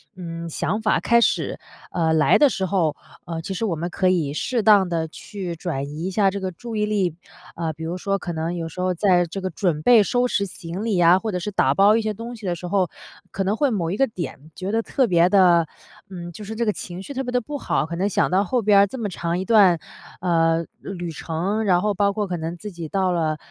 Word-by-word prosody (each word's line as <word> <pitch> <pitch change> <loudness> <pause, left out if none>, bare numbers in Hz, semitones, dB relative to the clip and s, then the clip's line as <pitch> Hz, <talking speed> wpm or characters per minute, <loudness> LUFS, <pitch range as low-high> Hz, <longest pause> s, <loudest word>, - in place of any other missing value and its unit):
嗯， 170 -2 -6
想 210 +7 -2
法 215 - +2
开 235 0 +3
始， - - 0 0.3
呃， 165 -2 +1
来 155 -1 +4
的 290 -2 +5
时 190 -5 -2
候， 175 -5 +1 0.3
呃， 165 0 -4
其 190 +4 -5
实 225 +5 -2
我 175 - -1
们 170 +3 -3
可 185 - 0
以 155 -6 0
适 235 +8 -1
当 205 -3 +6
地 165 -1 -1
去 180 +1 -7
转 160 -5 -3
移 155 +4 -6
一 190 - -2
下 195 0 +3
这 200 - -4
个 190 -1 -3
注 230 +6 -8
意 210 0 +1
力。 195 -6 0 0.4
啊， 165 -2 -2
比 160 +2 -9
如 170 +3 -3
说 195 +2 -1
可 175 - -5
能 165 +2 -2
有 165 -1 -4
时 170 - -11
候 185 0 +1
在 180 -1 +3
这 185 +4 -6
个 185 - -2
准 165 -3 -1
备 230 +2 +6
收 245 +5 +1
拾 200 -4 0
行 180 +2 -6
李 205 -6 +1
啊， 175 +2 +6
或 220 +1 -3
者 180 - -2
是 210 +4 -4
打 135 -7 +2
包 200 +6 +5
一 230 - +1
些 215 0 -2
东 230 +3 -7
西 220 -3 -11
的 175 -1 -1
时 180 +1 -7
候， 185 -2 +1 0.4
可 195 - -2
能 200 +3 0
会 285 +3 +2
某 175 -8 -1
一 195 - -2
个 270 - +3
点 160 -6 -7
觉 190 +2 -4
得 225 +1 +1
特 260 +2 +1
别 175 -3 +4
地， 175 -4 +5 0.4
嗯， 175 -2 -7
就 210 - -10
是 220 +2 -6
这 235 +1 -1
个 210 - +2
情 180 +1 -7
绪 280 - -8
特 270 0 -2
别 245 - -4
地 250 - +1
不 290 +5 -5
好， 210 - 0
可 170 +2 -5
能 190 +3 0
想 - - +1
到 190 +2 +3
后 240 +5 0
边 205 -1 +5
儿 200 - +5
这 260 - -8
么 215 -4 -3
长 170 0 -2
一 - - -2
段， 200 -7 +5 0.4
呃， 165 -2 +2
旅 175 -3 -6
程， 175 +8 -2
然 180 -2 +3
后 210 -1 +1
包 200 +1 +1
括 205 -1 -2
可 175 -1 -3
能 165 +2 -5
自 210 +3 -8
己 170 -2 -7
到 190 +1 0
了， 160 -3 0
185 Hz, 280 characters per minute, -23 LUFS, 170-210 Hz, 0.4 s, 当